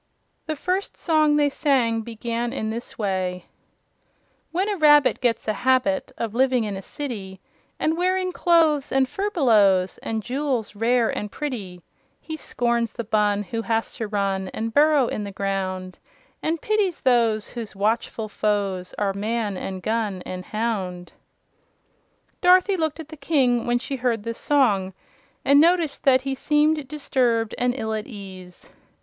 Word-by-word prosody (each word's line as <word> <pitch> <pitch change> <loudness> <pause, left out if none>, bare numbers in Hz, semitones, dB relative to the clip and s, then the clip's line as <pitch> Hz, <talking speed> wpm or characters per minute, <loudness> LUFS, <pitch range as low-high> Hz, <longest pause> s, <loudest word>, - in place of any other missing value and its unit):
The 310 - -1
first 365 +6 -2
song 310 -3 +3
they 290 -1 +3
sang 245 -7 +1
began 235 +1 -4
in 220 0 -2
this 235 +2 -6
way: 185 -3 -2 1.1
"When 370 +4 0
a 415 - 0
rabbit 295 -5 +5
gets 235 -3 0
a 215 - +1
habit 250 -4 +1
Of 225 -2 -3
living 255 -1 +2
in 205 -2 -3
a 190 - -6
city 200 -7 -6 0.4
And 315 +1 +1
wearing 370 +1 0
clothes 325 -5 +3
and 265 -1 +3
furbelows 225 - +2
And 220 -1 -3
jewels 255 -4 -2
rare 230 +2 +2
and 210 -1 -4
pretty, 200 - -5 0.4
He 315 - -6
scorns 235 -6 -1
the 235 - -4
Bun 210 -1 +1
who 225 +4 -4
has 225 0 -1
to 225 -3 -3
run 195 -2 -1
And 225 0 -3
burrow 295 -1 +5
in 215 - -3
the 200 - -6
ground 190 -2 -3 0.4
And 325 +1 -1
pities 420 -3 0
those 230 -4 +2
whose 230 -4 -7
watchful 220 +2 -1
foes 200 -3 -2
Are 200 -2 0
man 210 0 -2
and 185 0 -5
gun 215 -4 -1
and 185 0 -6
hound." 195 -6 -3 1.3
Dorothy 370 +2 +5
looked 315 -3 -2
at 315 -1 -8
the 315 - -10
King 265 -5 +1
when 240 0 +2
she 260 +2 -4
heard 235 -4 -1
this 230 0 -5
song 205 -10 +2 0.5
and 285 +1 +6
noticed 335 -3 +2
that 260 -1 +5
he 270 0 -2
seemed 300 +1 +1
disturbed 250 -6 0
and 245 0 +1
ill 220 -3 -2
at 215 -1 -4
ease. 190 -6 -11
235 Hz, 155 wpm, -23 LUFS, 205-290 Hz, 1.3 s, and